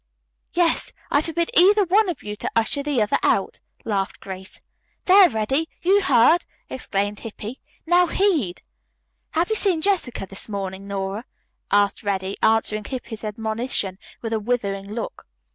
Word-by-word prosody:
"Yes, 340 Hz, -2 st, +1 dB, 0.2 s
I 285 Hz, -, +4 dB
forbid 335 Hz, +1 st, -2 dB
either 400 Hz, +4 st, +6 dB
one 395 Hz, +3 st, +3 dB
of 320 Hz, -10 st, -5 dB
you 210 Hz, 0 st, -5 dB
to -, -, -3 dB
usher 230 Hz, +5 st, +2 dB
the 280 Hz, -6 st, +1 dB
other 210 Hz, -, +1 dB
out," -, -, +1 dB, 0.3 s
laughed 195 Hz, -3 st, -2 dB
Grace. 190 Hz, 0 st, -9 dB, 0.4 s
"There, 380 Hz, -1 st, +8 dB
Reddy, 265 Hz, +8 st, -1 dB
you 390 Hz, +3 st, +4 dB
heard!" 300 Hz, +1 st, +5 dB, 0.3 s
exclaimed 205 Hz, -4 st, -2 dB
Hippy. 225 Hz, +2 st, -7 dB, 0.3 s
"Now 350 Hz, +1 st, +4 dB
heed." 325 Hz, -, 0 dB, 0.7 s
"Have 335 Hz, +4 st, +1 dB
you -, -, +3 dB
seen 385 Hz, -6 st, +2 dB
Jessica 360 Hz, -, 0 dB
this 195 Hz, +3 st, -7 dB
morning, 195 Hz, -1 st, -5 dB
Nora?" 200 Hz, +3 st, -4 dB, 0.5 s
asked 205 Hz, 0 st, +3 dB
Reddy, 195 Hz, -2 st, -2 dB
answering 215 Hz, -1 st, +2 dB
Hippy's 240 Hz, -3 st, -6 dB
admonition 220 Hz, -2 st, -3 dB, 0.2 s
with 225 Hz, -1 st, -2 dB
a 220 Hz, -, +1 dB
withering 200 Hz, -4 st, -2 dB
look. 225 Hz, +1 st, -6 dB
225 Hz, 145 wpm, -23 LUFS, 205-335 Hz, 0.7 s, There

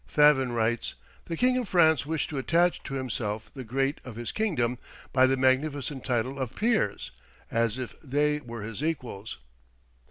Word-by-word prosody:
Favin 150 Hz, -4 st, +5 dB
writes: 115 Hz, +1 st, 0 dB, 0.3 s
"The 165 Hz, -, -4 dB
King 250 Hz, +1 st, +3 dB
of 240 Hz, -, -4 dB
France 160 Hz, -5 st, +4 dB
wished 160 Hz, 0 st, -1 dB
to 145 Hz, -, -2 dB
attach 170 Hz, +6 st, +2 dB
to 135 Hz, -, -4 dB
himself 110 Hz, -4 st, -3 dB
the 135 Hz, -, -6 dB
great 135 Hz, +5 st, -1 dB
of 125 Hz, -4 st, -9 dB
his 120 Hz, 0 st, -4 dB
kingdom, 125 Hz, -, 0 dB, 0.3 s
by 130 Hz, 0 st, +6 dB
the 135 Hz, +1 st, +2 dB
magnificent 135 Hz, +1 st, +1 dB
title 125 Hz, +3 st, -1 dB
of 130 Hz, -3 st, -3 dB
peers, 215 Hz, -, 0 dB, 0.4 s
as 115 Hz, 0 st, +1 dB
if 125 Hz, -2 st, -5 dB
they 150 Hz, +1 st, +1 dB
were 115 Hz, -6 st, -7 dB
his 115 Hz, +5 st, -5 dB
equals." 125 Hz, -10 st, -3 dB
130 Hz, 165 wpm, -28 LUFS, 120-150 Hz, 0.4 s, by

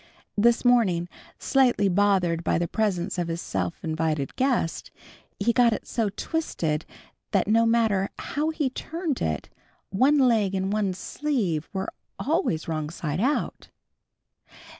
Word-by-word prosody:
This 235 Hz, +4 st, +3 dB
morning, 200 Hz, -9 st, +3 dB, 0.3 s
slightly 250 Hz, -7 st, +3 dB
bothered 185 Hz, -3 st, +2 dB
by -, -, +1 dB
the 170 Hz, +1 st, 0 dB
presence 190 Hz, -4 st, -1 dB
of 175 Hz, -, -1 dB
his 165 Hz, 0 st, -3 dB
self 90 Hz, -, -3 dB
invited 155 Hz, -3 st, -1 dB
guest, 255 Hz, -11 st, 0 dB, 0.5 s
he 230 Hz, +4 st, +2 dB
got 235 Hz, -1 st, +4 dB
it -, -, -5 dB
so 225 Hz, -3 st, 0 dB
twisted 175 Hz, -, -2 dB, 0.5 s
that 195 Hz, -2 st, +2 dB
no 230 Hz, +2 st, +4 dB
matter 220 Hz, -4 st, +2 dB
how 300 Hz, +2 st, -2 dB
he 305 Hz, -5 st, -1 dB
turned 325 Hz, +1 st, -4 dB
it, 75 Hz, -3 st, -2 dB, 0.4 s
one 260 Hz, +10 st, +4 dB
leg 225 Hz, -7 st, +3 dB
and 190 Hz, +1 st, -1 dB
one 200 Hz, -3 st, 0 dB
sleeve 200 Hz, -, -2 dB
were 190 Hz, 0 st, -4 dB, 0.2 s
always 285 Hz, -, 0 dB
wrong 155 Hz, -2 st, -2 dB
side 155 Hz, -1 st, -3 dB
out. 280 Hz, +5 st, -1 dB
200 Hz, 140 wpm, -26 LUFS, 170-245 Hz, 0.5 s, got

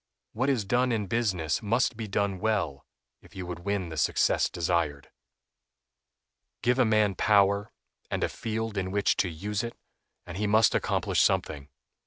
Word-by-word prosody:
What 130 Hz, +5 st, 0 dB
is 120 Hz, -7 st, +1 dB
done 125 Hz, +5 st, +1 dB
in 110 Hz, -3 st, 0 dB
business 95 Hz, -7 st, -1 dB
must 115 Hz, +3 st, +1 dB
be 110 Hz, -1 st, -5 dB
done 100 Hz, -1 st, -1 dB
well 95 Hz, -10 st, -1 dB, 0.3 s
if -, -, -19 dB
you 95 Hz, -1 st, -5 dB
would 90 Hz, -1 st, -6 dB
win 95 Hz, -1 st, -2 dB
the 80 Hz, -, -7 dB
success -, -, +2 dB
desired. 85 Hz, -5 st, -1 dB, 1.5 s
Give 125 Hz, +2 st, +2 dB
a 130 Hz, -, +5 dB
man 110 Hz, -2 st, +3 dB
power, 100 Hz, +1 st, +3 dB, 0.4 s
and -, -, -2 dB
a -, -, +2 dB
field 110 Hz, -2 st, -3 dB
in 95 Hz, 0 st, -3 dB
which 100 Hz, +1 st, +1 dB
to 90 Hz, -, +1 dB
use 100 Hz, +6 st, -3 dB
it, 115 Hz, -, -6 dB, 0.5 s
and 90 Hz, 0 st, -7 dB
he 105 Hz, +1 st, 0 dB
must 110 Hz, +1 st, +4 dB
accomplish -, -, +1 dB
something. 75 Hz, -2 st, 0 dB
100 Hz, 165 wpm, -28 LUFS, 90-110 Hz, 1.5 s, a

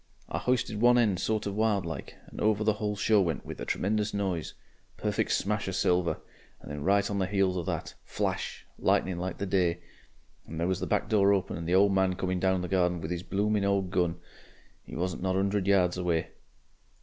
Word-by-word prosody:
I -, -, -3 dB
hoisted 120 Hz, -4 st, 0 dB
one 120 Hz, +1 st, +6 dB
end 105 Hz, -7 st, +2 dB
sort 110 Hz, +2 st, -1 dB
of 100 Hz, -, -2 dB
wild 105 Hz, -3 st, +1 dB
like, 80 Hz, -, -6 dB
and -, -, -9 dB
over 105 Hz, 0 st, +2 dB
the 110 Hz, 0 st, +3 dB
whole 105 Hz, -1 st, -1 dB
show 105 Hz, 0 st, +3 dB
went 85 Hz, -5 st, -2 dB
with -, -, -7 dB
a -, -, -3 dB
tremenjous 105 Hz, +1 st, 0 dB
noise. 95 Hz, -5 st, -2 dB, 0.4 s
Perfeck -, -, -1 dB
smash 105 Hz, 0 st, 0 dB
of 95 Hz, -, -2 dB
silver. 90 Hz, -2 st, +2 dB, 0.4 s
And -, -, -10 dB
then 75 Hz, 0 st, -5 dB
right 100 Hz, +2 st, +3 dB
on 100 Hz, -1 st, -2 dB
the 95 Hz, -, +1 dB
heels 95 Hz, -2 st, +1 dB
of 90 Hz, -2 st, -3 dB
that, -, -, -3 dB
Flash! -, -, -3 dB
Lightning 90 Hz, -2 st, +1 dB
like 90 Hz, +1 st, -3 dB
the 100 Hz, -, -3 dB
day! 90 Hz, -3 st, +1 dB, 0.7 s
and 80 Hz, -, -6 dB
there 85 Hz, -, +1 dB
was 95 Hz, 0 st, 0 dB
the -, -, -3 dB
back -, -, 0 dB
door 100 Hz, -2 st, +4 dB
open 95 Hz, -1 st, -1 dB
and 85 Hz, 0 st, -5 dB
the 90 Hz, -, +2 dB
old 100 Hz, +1 st, +5 dB
man 95 Hz, -1 st, +2 dB
coming 95 Hz, 0 st, -1 dB
down 95 Hz, 0 st, +2 dB
the 90 Hz, -, -3 dB
garden 90 Hz, -1 st, +1 dB
with 80 Hz, +1 st, -5 dB
'is 85 Hz, -1 st, -2 dB
blooming 105 Hz, +2 st, 0 dB
old 100 Hz, -2 st, +1 dB
gun. 85 Hz, -1 st, 0 dB, 0.7 s
He -, -, -8 dB
wasn't 90 Hz, -1 st, -2 dB
not 95 Hz, 0 st, 0 dB
a -, -, +2 dB
'undred 100 Hz, 0 st, 0 dB
yards 90 Hz, -3 st, +3 dB
away! 85 Hz, -3 st, 0 dB
95 Hz, 220 wpm, -29 LUFS, 90-100 Hz, 0.7 s, one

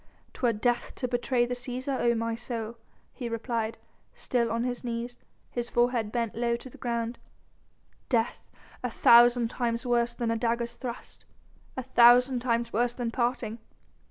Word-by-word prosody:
"'Twere 245 Hz, -2 st, +1 dB
death 240 Hz, +3 st, -1 dB
to 250 Hz, -, -2 dB
betray 245 Hz, 0 st, +1 dB
the 245 Hz, -, -3 dB
Cæsar, 255 Hz, +2 st, -3 dB
O 235 Hz, 0 st, +3 dB
my 230 Hz, 0 st, -1 dB
soul!" 230 Hz, -1 st, -4 dB, 0.4 s
he 245 Hz, -3 st, -5 dB
replied, 230 Hz, -1 st, -2 dB, 0.4 s
still 235 Hz, -2 st, 0 dB
on 230 Hz, +1 st, 0 dB
his 245 Hz, 0 st, -3 dB
knees, 240 Hz, 0 st, -4 dB, 0.4 s
his 240 Hz, -1 st, -3 dB
forehead 240 Hz, -3 st, +1 dB
bent 235 Hz, -2 st, -1 dB
low 235 Hz, 0 st, 0 dB
to 250 Hz, +2 st, -9 dB
the -, -, -14 dB
ground, 235 Hz, -1 st, -2 dB, 0.9 s
"Death, 230 Hz, -3 st, 0 dB, 0.3 s
a 250 Hz, -, -2 dB
thousand 235 Hz, 0 st, +6 dB
times 235 Hz, -1 st, -2 dB
worse 240 Hz, -1 st, +1 dB
than 235 Hz, -2 st, -1 dB
a -, -, +1 dB
dagger's 235 Hz, 0 st, -1 dB
thrust... 240 Hz, -1 st, -8 dB, 0.5 s
a 260 Hz, -, -2 dB
thousand 245 Hz, +1 st, +6 dB
times 235 Hz, -1 st, -1 dB
worse 240 Hz, +2 st, +1 dB
than 240 Hz, -2 st, -2 dB
parting." 235 Hz, -2 st, -1 dB
240 Hz, 155 wpm, -28 LUFS, 230-245 Hz, 0.9 s, thousand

